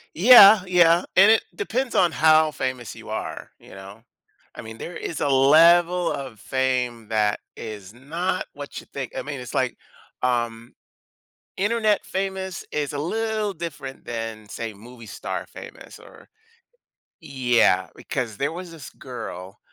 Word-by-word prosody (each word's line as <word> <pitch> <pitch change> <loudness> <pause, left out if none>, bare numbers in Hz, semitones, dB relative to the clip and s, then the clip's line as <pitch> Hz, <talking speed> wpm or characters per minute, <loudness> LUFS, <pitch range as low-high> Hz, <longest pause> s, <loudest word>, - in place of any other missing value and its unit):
Yeah, 210 +1 +9
yeah, 175 -1 +4
and 195 +4 +7
it 225 - +3
depends 265 - -2
on 175 -3 +4
how 155 0 +4
famous 130 -4 -4
you - - -12
are, - - -6
you - - -18
know? 100 +3 -12 0.5
I - - -8
mean, 110 0 -10
there 170 +8 -8
is 165 - -5
a - - +1
level 170 +6 +5
of 130 -6 -6
fame 125 -1 -2
that 105 -2 +1 0.2
is 105 -3 -9
not 165 +9 -3
what 145 0 -8
you - - -15
think, 135 -3 -6
I - - -2
mean, 145 -2 -6
it's 125 - -9
like, 130 -1 -1 0.5
um, 120 -2 -2 0.8
Internet 215 +1 +1
famous 190 -1 -4
is 145 -2 -2
a 145 - -5
little 215 +5 -2
different 145 -6 -8
than, 115 -2 -6
say, 115 +1 -6
movie 115 +3 -14
star - - -6
famous - - -12
or - - -17 0.9
yeah, 120 -8 +2
because 120 -5 -4
there 140 +2 -1
was 175 +1 -8
this 160 -5 -10
girl, 95 -7 -9
140 Hz, 150 wpm, -23 LUFS, 115-180 Hz, 0.9 s, Yeah